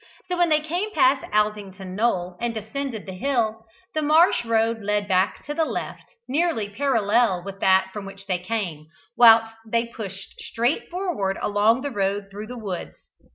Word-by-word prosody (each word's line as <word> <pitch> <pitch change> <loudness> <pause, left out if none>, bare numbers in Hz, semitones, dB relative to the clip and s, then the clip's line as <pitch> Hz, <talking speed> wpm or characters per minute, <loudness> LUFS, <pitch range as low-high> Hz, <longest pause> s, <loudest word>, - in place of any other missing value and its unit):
So 360 - 0
when 350 -1 +4
they 305 -1 +3
came 350 +8 -2
past 265 +1 +4
Aldington 205 -3 -1
Knoll, 185 -5 0
and 235 -1 -1
descended 220 +2 -5
the 190 - -7
hill, 225 -1 -1 0.3
the 310 - 0
marsh 310 -1 +4
road 225 0 +1
led 205 0 -1
back 185 -1 +1
to 295 - -4
the 320 - +1
left, - - -5
nearly 295 -7 0
parallel 225 -6 +2
with 195 0 -7
that 190 0 +3
from 210 -2 -6
which 195 0 -11
they 185 -2 -1
came, 180 -6 -4 0.3
whilst 225 -1 +7
they 230 +1 0
pushed 195 -5 -9
straight 240 +5 -1
forward 345 - -2
along 210 +4 +2
the 285 - -3
road 200 -2 -1
through 210 +2 -7
the 250 +1 -7
woods. 195 -6 -5
220 Hz, 170 wpm, -24 LUFS, 195-255 Hz, 0.3 s, whilst